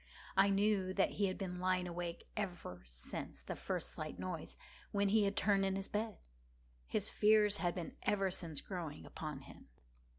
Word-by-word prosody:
I 195 +1 +6
knew 195 -1 +3
that 195 - +3
he 200 0 +2
had 185 - -2
been 180 -3 -3
lying 185 0 +2
awake 175 -1 -4
ever 175 - -3
since - - -5
the - - -4
first - - -2
slight - - -5
noise, - - -4 0.3
when 200 -1 +3
he 210 0 +5
had 200 0 +1
turned 200 -1 +4
in 195 0 +2
the 195 0 -1
bed. 215 0 -1 0.7
His - - 0
fears 210 -1 +5
had 175 -1 0
been 175 -3 -4
ever 195 -2 +2
since 165 -5 -2
growing 170 -6 -5
upon 150 -3 -5
him. - - -13
190 Hz, 175 wpm, -37 LUFS, 175-205 Hz, 0.7 s, I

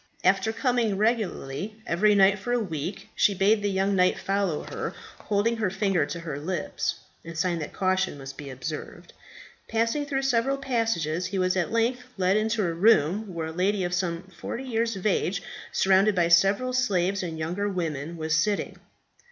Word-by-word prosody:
After 195 +4 +3
coming 230 -3 +1
regularly 210 - -1
every 205 +5 +3
night 195 0 +5
for 245 +5 -2
a 245 - +2
week, 175 -3 -4
she 200 - +3
bade 205 +3 +3
the 205 - 0
young 195 +1 +1
knight 180 -1 +3
follow 195 -5 -1
her, - - -5 0.2
holding 220 +3 0
her 215 -4 0
finger 195 -5 +1
to 170 - -5
her 150 -4 -5
lips 175 +3 -3 0.2
in 165 0 -8
sign 170 +1 0
that 150 - -5
caution 185 -4 0
must 135 0 -8
be 140 -1 -8
observed. 130 +4 -7 0.6
Passing 230 +6 0
through 270 -1 -1
several 265 +1 +1
passages, 225 - -1
he 195 +1 -3
was 185 0 +1
at 180 -3 0
length 230 +2 +1 0.2
led 185 +1 +2
into 215 -1 +1
a 170 - -1
room 195 +1 +3
where 165 -2 -4
a - - -5
lady 190 +4 0
of 175 0 -2
some 175 -1 -1
forty 190 +7 -7
years 230 -3 -1
of 190 - -8
age, 195 -2 +1 0.3
surrounded 195 +2 +4
by 170 -2 +2
several 195 +9 +4
slaves 195 -6 +1
and 165 -3 -4
younger 175 +6 -2
women, 165 -3 -3
was 160 0 0
sitting. 200 +7 0
195 Hz, 180 wpm, -26 LUFS, 170-220 Hz, 0.6 s, night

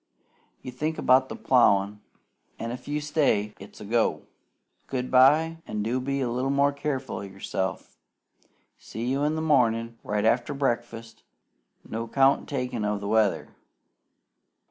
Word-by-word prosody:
You 130 - -6
think 155 +5 -3
about 130 +1 +3
the - - -5
plowin', 105 -5 +2 0.6
an', 115 - -4
if 125 - -8
you 145 +1 -1
say 145 -9 +1
`stay,' - - -23
it's 100 - -13
a - - -9
go! 115 +2 0 0.6
Good 130 -1 -3
bye; 150 +6 +5
an' 105 -1 -3
do 120 +4 -1
be 140 +1 -2
a 125 - -1
little 125 +3 -1
more 140 +1 +3
careful 140 -3 -3
o' - - -5
yourself. 95 -1 -5 0.8
See 115 +3 -6
you 135 +3 0
in 150 +1 +1
the 160 - -2
mornin', 115 -6 +1
right 105 0 -1
after 120 +5 +1
breakfast, 120 -4 -3 0.7
no 115 +1 -4
count 135 +3 +2
taken 125 -5 -3
o' 105 0 0
the 100 0 -6
weather." 110 -2 +1
125 Hz, 155 wpm, -26 LUFS, 110-140 Hz, 0.8 s, bye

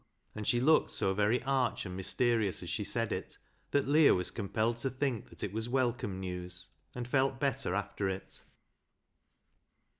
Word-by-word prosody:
And 110 -1 -5
she 120 - +3
looked 155 +6 +4
so 95 - +1
very 105 +5 +2
arch 130 -5 0
and 90 -1 -5
mysterious 110 +1 +1
as - - -5
she - - -1
said - - -1
it, - - -4 0.3
that 140 -1 +1
Leah 150 +1 +6
was 90 -1 0
compelled 110 +2 -1
to 135 +3 -1
think 130 -3 -2
that - - -10
it 100 - -3
was 110 +2 -2
welcome 120 -6 0
news, 90 -1 -6 0.2
and 120 -1 -4
felt 135 +1 +1
better 135 -8 0
after 100 -1 -2
it. 95 0 -6
115 Hz, 170 wpm, -32 LUFS, 95-130 Hz, 0.3 s, Leah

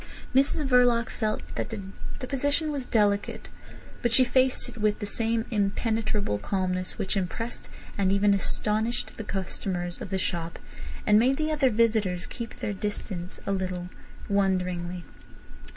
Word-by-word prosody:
Mrs 275 +2 +3
Verloc 245 -2 +4
felt 215 -2 -1
that - - -3
the 200 +3 -7
position 285 +4 +1
was 280 -3 -3
delicate, 205 -2 +1 0.5
but 240 - +1
she 255 - +6
faced 255 +1 +2
it - - -10
with 210 0 +2
the 210 - -4
same 225 +2 0
impenetrable 210 - 0
calmness 185 - -1
which 190 - -1
impressed 200 +5 -3 0.3
and 190 -1 +3
even 200 +1 +4
astonished 215 +4 0
the 220 - -4
customers 185 -2 -3
of - - -5
the 190 - 0
shop 170 -3 -2 0.5
and 210 0 +6
made 260 +4 +3
the 310 0 0
other 290 -4 +3
visitors 215 -6 +2
keep 235 -1 -7
their 210 - -3
distance 190 -3 -4
a - - -1
little 185 -2 -2 0.4
wonderingly. 180 -3 0
210 Hz, 145 wpm, -27 LUFS, 190-235 Hz, 0.5 s, she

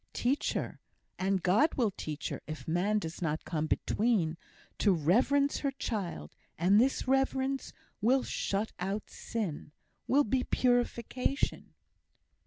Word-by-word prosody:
Teach 260 +4 0
her - - -3 0.4
(and 190 -1 +1
God 215 - +3
will 230 -6 +2
teach 150 -1 -4
her, - - -5
if 155 0 -7
man 180 +6 +1
does 165 -5 -4
not 155 -2 -1
come 155 -2 -1
between) 200 -4 +1 0.4
to 205 - +4
reverence 245 - +3
her 280 - 0
child; 200 - -4 0.2
and 195 +6 +5
this 265 +1 +1
reverence 270 0 +1 0.3
will 255 +5 +3
shut 205 +2 -2
out 195 +3 -3
sin, 190 -10 -4 0.4
will 285 +3 +4
be 255 +1 +1
purification." 245 +2 0
215 Hz, 130 wpm, -31 LUFS, 175-260 Hz, 0.4 s, and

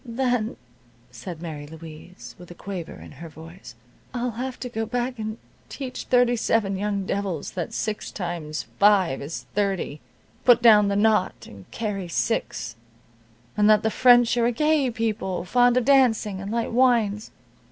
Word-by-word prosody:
"Then," 245 -2 -1 0.5
said 155 +8 -8
Mary 150 -3 -6
Louise, 160 +3 -11
with 180 - -13
a 175 - -10
quaver 185 -4 -7
in - - -12
her 165 +4 -10
voice, 160 -2 -12 0.4
"I'll 245 0 -1
have 255 +3 -5
to 250 - -3
go 225 -2 -4
back 245 0 -3
and 220 0 -4 0.3
teach 260 -3 -6
thirty 245 -1 +3
seven 220 -3 0
young 200 0 -2
devils 190 -6 -3
that 175 -3 -4
six 215 -1 -3
times 170 -4 -5 0.2
five 200 -8 +4
is 145 +4 -6
thirty, 195 -7 -2 0.4
put 245 -1 +6
down 215 -3 +6
the 200 - 0
naught 210 -2 +1
and 100 -2 -14
carry 205 -5 -4
six, 165 - -2 0.8
and 210 0 +3
that 215 -1 +5
the 220 - +1
French 245 -1 +5
are 235 -1 +3
a - - +2
gay 300 +1 +2
people, 215 -6 -2
fond 245 +4 +3
of 250 - +1
dancing 230 -8 +3
and 195 +1 -6
light 230 0 -1
wines. 230 -4 +2
210 Hz, 165 wpm, -24 LUFS, 180-240 Hz, 0.8 s, put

